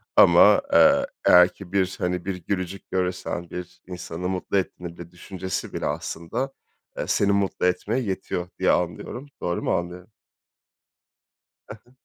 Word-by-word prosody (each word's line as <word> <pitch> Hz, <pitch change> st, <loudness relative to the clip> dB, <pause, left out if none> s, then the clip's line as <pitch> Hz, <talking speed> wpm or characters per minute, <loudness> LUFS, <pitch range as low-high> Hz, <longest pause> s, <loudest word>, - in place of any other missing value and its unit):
Ama, -, -, +7 dB
eee, 280 Hz, 0 st, +6 dB, 0.2 s
eğer 90 Hz, 0 st, +7 dB
ki 95 Hz, -3 st, -12 dB
bir, 95 Hz, -1 st, +1 dB
hani, 90 Hz, 0 st, -2 dB
bir 95 Hz, 0 st, -2 dB
gülücük 95 Hz, -1 st, -4 dB
görürsen, 90 Hz, -2 st, -2 dB
bir 90 Hz, 0 st, -8 dB
insanı 90 Hz, -1 st, -5 dB
mutlu 95 Hz, +1 st, -1 dB
etmede 85 Hz, -2 st, -5 dB
düşüncesi 95 Hz, +1 st, -5 dB
bile, -, -, -3 dB
aslında, 105 Hz, +12 st, -3 dB, 0.4 s
eee, -, -, -3 dB
seni 100 Hz, 0 st, +2 dB
mutlu 100 Hz, -2 st, 0 dB
etmeye 105 Hz, +7 st, 0 dB
yetiyor 95 Hz, -4 st, -3 dB
diye -, -, +3 dB
anlıyorum. 90 Hz, +10 st, -2 dB
Doğru 85 Hz, 0 st, -1 dB
mu -, -, +1 dB
anlıyorum? 90 Hz, +2 st, -4 dB, 1.6 s
He -, -, -7 dB
he. 120 Hz, -, -24 dB
90 Hz, 140 wpm, -24 LUFS, 90-100 Hz, 1.6 s, Ama